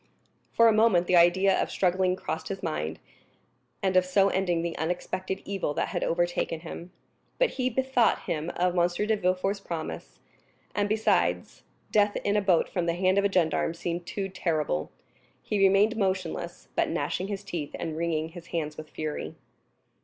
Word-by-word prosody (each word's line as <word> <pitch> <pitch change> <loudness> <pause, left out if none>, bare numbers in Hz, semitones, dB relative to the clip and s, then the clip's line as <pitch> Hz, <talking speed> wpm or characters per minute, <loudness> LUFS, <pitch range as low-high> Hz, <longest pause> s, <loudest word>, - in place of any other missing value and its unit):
For 230 - +5
a 225 - +5
moment 215 -5 +4
the 180 - +2
idea 180 +3 +5
of - - -1
struggling 185 0 +1
crossed 160 - -4
his 195 -1 -5
mind, 75 +1 -2 0.9
and 190 -1 +1
of 185 - +6
so 195 +2 +3
ending 175 -4 0
the 170 -1 -3
unexpected 180 +3 -3
evil 195 -7 -2
that - - -1
had - - -2
overtaken 175 -1 0
him. 170 +1 -8 0.5
But - - +2
he 255 -1 -1
bethought 255 -1 +2
him 155 +1 -2
of 180 0 +1
M. 175 -1 +4 0.2
de 220 - +3
Villefort's 190 +1 0
promise; 170 -5 -6 0.6
and, 205 0 0
besides, 195 - +1 0.3
death 205 -1 +3
in 205 - +1
a 210 - +3
boat 185 -4 +3
from 175 -2 -2
the 170 - +1
hand 185 +2 +3
of 200 - +1
a 200 - +2
gendarme 165 -2 +1
seemed 170 0 -4
too 195 +2 -3
terrible. 155 - -1 0.5
He 210 - -1
remained 195 +3 +4
motionless, 185 -4 -2
but - - +1
gnashing 180 +2 -2
his 200 -1 -4
teeth 170 -7 -5
and 160 - -4
wringing 160 -1 -1
his 170 0 -11
hands 155 -3 -3
with 155 -1 -9
fury. 155 -1 -5
180 Hz, 175 wpm, -27 LUFS, 170-195 Hz, 0.9 s, of